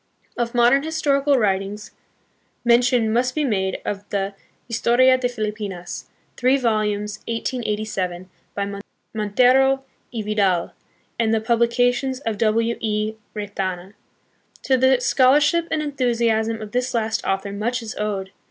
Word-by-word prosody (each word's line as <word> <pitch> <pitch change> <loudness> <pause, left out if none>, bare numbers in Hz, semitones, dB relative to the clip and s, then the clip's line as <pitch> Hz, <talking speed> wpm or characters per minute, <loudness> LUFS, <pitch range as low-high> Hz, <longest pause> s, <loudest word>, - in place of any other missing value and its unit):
Of 240 0 -2
modern 240 +3 +5
historical 290 -3 +1
writings 205 -1 -1 0.7
mention 240 -2 +3
must 250 +2 +1
be 305 - +1
made 190 -7 0
of 205 0 -4
the 200 0 -2 0.3
Historia 245 +2 +4
de 255 -1 -1
Filipinas, 210 -6 -5 0.3
three 255 +2 +3
volumes, 210 -4 -1
1887, 210 -6 -3 0.3
by 200 0 -3 0.3
Montero 255 +6 +3 0.3
y 225 -3 -4
Vidal, 200 -5 +1 0.5
and 225 -1 +2
the 225 - +2
publications 240 +3 +1
of 225 -5 -3
W. 230 +1 +1
E. 215 0 -1 0.2
Retana. 195 -2 -4 0.7
To 265 - +3
the 260 0 +4
scholarship 290 +7 +3
and 310 -1 -1
enthusiasm 230 -5 0
of 210 - -9
this 250 0 -1
last 220 -1 -1
author 195 +1 -1
much 235 +4 -2
is 220 - -6
owed. 200 -2 -3
225 Hz, 125 wpm, -22 LUFS, 210-250 Hz, 0.7 s, modern